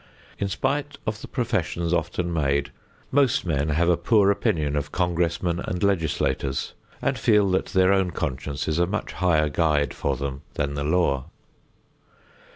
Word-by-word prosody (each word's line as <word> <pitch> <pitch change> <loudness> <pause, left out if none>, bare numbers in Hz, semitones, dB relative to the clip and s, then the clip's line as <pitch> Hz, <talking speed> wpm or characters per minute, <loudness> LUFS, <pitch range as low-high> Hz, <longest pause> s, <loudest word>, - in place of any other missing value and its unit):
In 100 - 0
spite 140 +7 -2
of 110 -1 -3
the - - -8
professions 90 - -1
often 85 +1 -1
made, 70 -3 0 0.4
most 135 -7 +3
men 75 -3 0
have 80 +3 +2
a 90 - +5
poor 100 +3 +3
opinion 80 -9 0
of 75 0 -2
congressmen 85 -1 0
and 90 +1 -3
legislators, 80 -7 0 0.3
and - - 0
feel 105 -3 +4
that 95 - +1
their 95 +1 +3
own 95 -2 +2
conscience 70 -2 -3
is 80 +1 0
a 85 - +3
much 105 +4 -3
higher 80 -4 +2
guide 75 -2 +1
for 70 -2 -1
them 70 0 -4
than 70 0 -1
the 70 0 -2
law. 75 -4 +1
85 Hz, 160 wpm, -24 LUFS, 75-95 Hz, 0.4 s, a